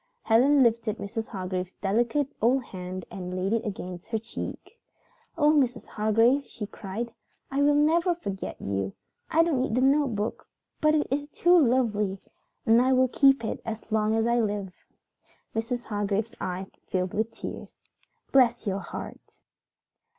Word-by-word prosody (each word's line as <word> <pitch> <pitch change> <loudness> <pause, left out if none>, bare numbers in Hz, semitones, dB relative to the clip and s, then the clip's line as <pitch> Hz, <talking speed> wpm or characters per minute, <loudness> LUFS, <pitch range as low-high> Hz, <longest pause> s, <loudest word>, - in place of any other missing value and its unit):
Helen 265 +5 +5
lifted 230 -2 +1
Mrs. 220 +3 -4
Hargrave's 185 -2 -4
delicate 235 +8 0
old 250 +4 +3
hand 185 -3 -7
and 180 -1 -5
laid 190 +3 0
it 230 0 +1
against 185 -4 -6
her 225 - 0
cheek. 230 - -7 0.6
"Oh, 300 -1 +5
Mrs. 260 -5 +1
Hargrave," 225 +6 +2
she 215 - -6
cried, 215 +4 -6 0.4
"I 275 +1 +1
will 290 0 +4
never 335 +4 +3
forget 200 - -5
you. 95 0 -2 0.4
I 330 +1 +4
don't 310 -7 +1
need 255 -4 -1
the 250 - +2
notebook, 265 -6 +1 0.3
but 305 0 +4
it 300 - +2
is 290 +1 -1
too 350 +4 +3
lovely, 230 - +2 0.5
and 225 +2 +6
I 260 +1 +3
will 255 0 +4
keep 270 -2 +4
it - - -3
as 225 0 -6
long 215 0 +2
as 225 0 +2
I 235 +1 +2
live." 205 -4 -2 0.8
Mrs. 240 +2 -2
Hargrave's 205 +1 -2
eyes 185 +1 -3 0.2
filled 185 -1 -1
with 220 +2 0
tears. - - -8 0.5
"Bless 240 -3 +4
your 195 -1 -1
heart!" - - -9
225 Hz, 155 wpm, -27 LUFS, 200-265 Hz, 0.8 s, and